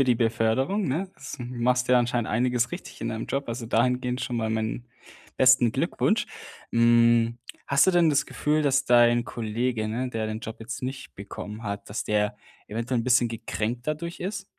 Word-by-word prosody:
für 135 - +5
die 125 -1 +3
Beförderung, 120 - +1
ne? 180 +8 -2
S 135 - -8
machst 125 +1 0
ja 125 0 +6
anscheinend 120 -1 0
einiges 120 +1 +1
richtig 175 - -8
in 115 - -2
deinem 110 0 -4
Job, 140 -2 -3
also 115 0 -4
dahingehend 125 +2 +1
schon 125 -2 -3
mal 110 -1 -1
meinen 110 +2 -2 0.5
besten 130 -3 +5
Glückwunsch. - - 0 0.5
Hm, 115 0 +4 0.3
hast 140 +4 +4
du 190 - +6
denn 175 -2 +4
das 145 +1 +2
Gefühl, 150 +1 0
dass 135 -1 +2
dein 120 -1 +5
Kollege, 115 0 -2
ne, 120 +4 -2
der 110 -3 -3
den 110 +1 -4
Job 110 -2 -7
jetzt 115 +2 -6
nicht 130 +1 -6
bekommen 105 +2 -8
hat, 100 -1 -5
dass 105 - -3
der 105 0 0 0.3
eventuell 115 +3 -2
'n 115 - -5
bisschen 125 -1 +4
gekränkt 115 +1 -4
dadurch 160 +3 -3
ist? 190 +1 -4
120 Hz, 185 wpm, -26 LUFS, 115-130 Hz, 0.5 s, ja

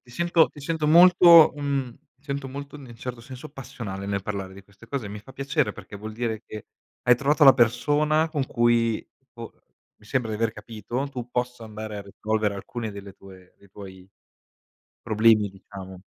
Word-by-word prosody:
ti 120 - -18
sento 170 +4 +2
ti 145 - -11
sento 160 +1 -2
molto 170 0 +8
mhmm, 140 -4 -2 0.2
ti 140 - -37
sento 140 -2 -4
molto 140 +2 -8
in 145 - -12
nel 120 -3 -13
certo 125 -1 -6
senso 130 +4 -10
passionale 115 -8 -8
nel 100 -1 -2
parlare 100 -2 -5
di 100 - -13
queste 100 +3 -19
cose, 125 -5 -4
mi 105 +1 -7
fa 130 +5 -15
piacere 135 -5 -1
perché 100 - -11
vuol 110 +2 -8
dire 115 -1 -3
che 105 - -9 0.4
hai 125 -1 +5
trovato 145 +4 +2
la 135 -3 +9
persona 150 +6 +2
con 145 -4 -2
cui 120 -2 +1 0.3
po - - -9 0.5
mi 105 - -20
sembra 125 -3 -1
di 105 - -3
aver 115 0 0
capito, 115 +5 -5
tu 125 -3 -7
possa 125 -1 -3
andare 110 -1 -7
a 100 - -6
risolvere 105 +1 -2
alcune 110 +3 -6
delle 100 -1 -10
tue 95 -2 -16
dei 100 - -21
tuoi 95 -2 -12 0.9
problemi, 110 -2 +3
diciamo. 95 -1 -11
115 Hz, 185 wpm, -25 LUFS, 105-140 Hz, 0.9 s, la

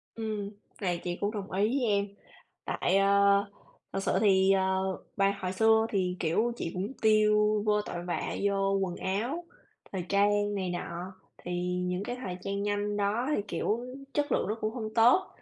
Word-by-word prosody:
Ừm, 215 -3 -3 0.3
này 175 -2 -1
chị 175 0 -3
cũng 205 +1 0
đồng 205 -3 -6
ý 200 +3 +2
với 245 - 0
em. 200 0 +2 0.6
Tại, 190 +2 +1
ơ, 195 0 +4 0.8
thật - - -1
sự - - +1
thì, 190 -2 +5
ờ, 190 0 +1 0.2
bài 195 0 +3
hồi 185 0 -3
xưa 220 +2 +4
thì, 185 -3 -1
kiểu, 215 +9 +1
chị 165 - -4
cũng 195 +8 -3
tiêu 210 -1 +4
vô 210 0 +3
tội 175 -4 -6
vạ 175 - -2
vô 195 -1 +1
quần 180 -2 -2
áo, 240 - -2 0.5
thời 185 -3 -3
trang 205 +1 +2
này 185 -2 -2
nọ 175 +1 -5 0.2
thì 180 - -7 0.3
những 180 +1 -2
cái 245 - -4
thời 185 -8 -5
trang 200 +1 -3
nhanh 205 0 -1
đó 210 +6 0
thì, - - 0
kiểu, 220 +3 -1 0.3
chất 290 -2 0
lượng - - +1
nó 215 - 0
cũng 215 +1 -1
hông 220 -3 -5
tốt. 240 +11 +5
200 Hz, 185 wpm, -29 LUFS, 190-215 Hz, 0.8 s, thì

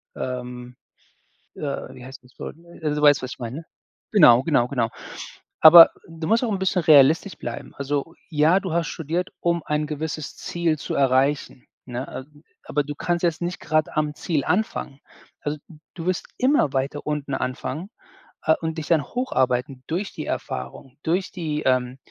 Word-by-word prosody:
ähm, 125 -1 -6 0.8
äh - - -9 0.3
wie 125 -1 -11
heißt 135 0 -11
das 125 - -23
Wort? - - -7 0.3
Äh, 155 - 0
du 150 - -2
weißt, 145 -2 +6
was 130 - -5
ich - - -10
meine? 125 +7 -6 0.5
Genau, 130 - +7
genau, 140 -7 +3
genau. 120 -4 0 0.7
Aber 165 +1 +11 0.2
du 165 -1 -6
musst 225 +3 +3
auch 235 - -1
'n 195 - -1
bisschen 190 -1 +1
realistisch 155 +5 +5
bleiben. - - -7
Also, 140 +3 -3 0.2
ja, 160 +4 +4
du 185 -4 -4
hast 170 0 0
studiert, 170 +3 -3
um 170 -2 0
ein 150 0 -1
gewisses 155 0 -5
Ziel 170 -3 -1
zu - - -4
erreichen, 135 0 +1 0.2
ne? 125 +1 -5 0.2
Äh, 150 0 -22 0.2
aber 145 - 0
du 145 +1 -5
kannst 175 +3 -1
jetzt 170 0 0
nicht 175 +1 -3
grade 155 0 0
am 150 -1 0
Ziel 155 -3 -1
anfangen. 170 -7 -1 0.4
Also, 150 +1 -3
d 160 - -15 0.2
du 165 -1 -7
wirst 185 -1 -1
immer 255 - +3
weiter 140 +3 -2
unten 145 -2 -2
anfangen, 130 +8 -4 0.6
äh, 160 - +5
und 160 0 -3
dich 150 - -6
dann 160 -4 +3
hocharbeiten 130 - -1
durch 185 +5 -2
die - - -6
Erfahrung, 65 - -5
durch 180 +4 0
die, 155 -4 -3
ähm, 130 0 +1
150 Hz, 175 wpm, -23 LUFS, 135-170 Hz, 0.8 s, Aber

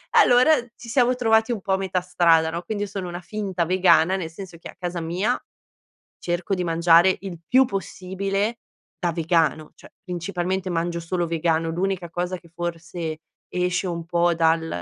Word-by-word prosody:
Allora, 250 +6 +6 0.2
ci 235 - -11
siamo 250 0 +3
trovati 225 -2 +2
un 225 -4 -2
po' 190 0 -1
a - - +3
metà 190 -1 -1
strada, 170 -3 +3
no, 170 +2 -4
quindi, 205 +3 -3
io - - -10
sono 190 -2 -5
una 175 +1 -6
finta 190 -2 -2
vegana, 180 0 +4
nel 170 -4 -4
senso 180 0 -10
che 165 - -10
a - - -12
casa 175 -1 -3
mia, 180 +9 -1 0.8
cerco 175 +3 -2
di 180 - -2
mangiare 170 +2 +5
il 185 -4 -7
più 260 +1 +5
possibile 195 +1 -3 0.4
da 175 -2 -1
vegano. 165 -2 0
Cioè - - -16
principalmente 185 0 -3
mangio 170 0 -1
solo 175 +1 -2
vegano, 165 0 0
l'unica 180 +1 -2
cosa 175 +2 -3
che 170 - -20
forse 170 -1 -5 0.3
esce 180 +1 -1
un 170 -2 -4
po' 175 0 +2
dal 165 0 +2
180 Hz, 175 wpm, -23 LUFS, 170-195 Hz, 0.8 s, Allora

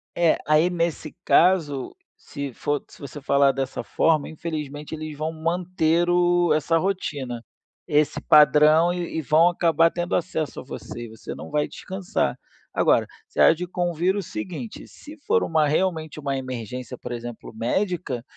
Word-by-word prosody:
É, 170 -2 +3
aí 155 +3 +4
nesse 170 -3 -2
caso, 160 -7 +3 0.2
se 140 -2 -7
for 145 +4 -2
se - - -17
você 140 +1 -8
falar 140 0 +4
dessa 135 0 -4
forma, 155 -3 +1
infelizmente 150 -2 -6
eles 155 -1 -6
vão 155 +2 -2
manter 170 +1 0
o 175 -1 +3
essa 155 +2 +2
rotina, 145 -10 -3 0.4
esse 150 0 +2
padrão 150 +3 +6
e 175 -2 -4
e - - 0
vão 160 +4 +4
acabar 165 -1 +3
tendo 175 0 -2
acesso 160 -4 -2
a - - -8
você, 120 -2 -8
e - - -10
você 110 0 -8
não - - -9
vai 150 0 +1
descansar. 190 +2 -3 0.4
Agora, - - +3 0.2
você - - -8
há - - +8
de 180 +3 -4
convir 175 +1 0
o 205 - -1
seguinte, 180 - -7
se 305 +2 -13
for 460 +1 +3
uma 155 -2 +2
realmente 160 -1 -1
uma 140 -2 -2
emergência 125 -1 -6
por - - -8
exemplo 120 -1 -7
médica, 130 - -2
155 Hz, 160 wpm, -24 LUFS, 140-175 Hz, 0.4 s, há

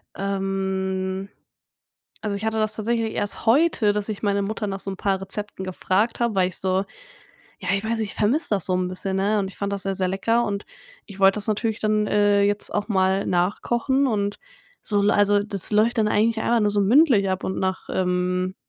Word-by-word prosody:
Ähm, 190 -1 -2 0.9
also, 210 -2 -2
ich 215 - -5
hatte 220 0 -1
das 215 0 0
tatsächlich 225 +1 -1
erst 205 - -4
heute, 250 -4 +4
dass 210 +1 -2
ich 215 0 -5
meine 200 -1 +1
Mutter 210 +1 -3
nach 195 0 -4
so 195 - -5
'n 190 - -7
paar 195 -1 0
Rezepten 200 0 -4
gefragt 190 +4 0
habe, 235 -3 0
weil 185 -1 +2
ich 185 - -7
so 190 +1 0 0.8
ja, - - -3
ich 200 - -1
weiß 225 +1 -1
nicht, 215 -2 -2
ich - - -12
vermisse 255 +10 +1
das 200 -5 0
so 185 - +1
'n 180 0 0
bisschen, 185 +1 -3
ne, 205 +2 +1
und 190 -1 -3
ich - - -13
fand 200 0 -2
das 200 - -2
sehr 195 0 -2
sehr 185 -1 0
lecker 225 +5 +1
und 200 0 -3 0.4
ich 200 -2 -12
wollte 195 +1 +5
das 210 - -2
natürlich 220 +1 -1
dann, 215 -1 +1
äh, 205 -1 +3
jetzt 205 0 +1
auch 205 - 0
mal 190 -1 +1
nachkochen 235 +9 +1
und 205 -4 -1 0.4
so 205 -1 +1
also, 205 0 +3
das 205 -1 -4
läuft 225 +3 +3
dann 215 - +3
eigentlich 220 +2 +2
einfach 235 +1 +2
nur 210 -1 +2
so 205 0 +1
mündlich 225 -1 +4
ab 185 0 -2
und 190 - -2
nach 190 0 -2
ähm, 180 0 0
200 Hz, 210 wpm, -23 LUFS, 190-215 Hz, 0.9 s, wollte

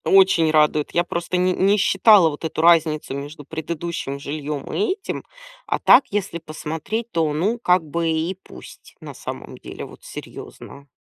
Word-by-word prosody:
Очень 190 -4 +5
радует. 150 -1 +2
Я 175 - +2
просто 175 +1 -3
ни 180 +1 +2
не 195 +3 +2
считала 195 -2 +5
вот 145 +1 -8
эту 160 0 -2
разницу 160 -4 +3
между 145 +2 -7
предыдущим 160 -2 -5
жильем 145 0 -5
и 405 -1 +1
этим. 395 - -6 0.4
А - - 0
так, - - +6
если 200 -4 -3
посмотреть, 160 +8 -5
то, 160 -2 0
ну, 200 +10 0
как 180 -6 +3
бы 165 +2 -2
и 160 +3 -1
пусть, - - -14
на - - -9
самом - - -8
деле. - - -8
Вот - - -15
серьезно. 140 0 -10
165 Hz, 165 wpm, -22 LUFS, 150-190 Hz, 0.4 s, так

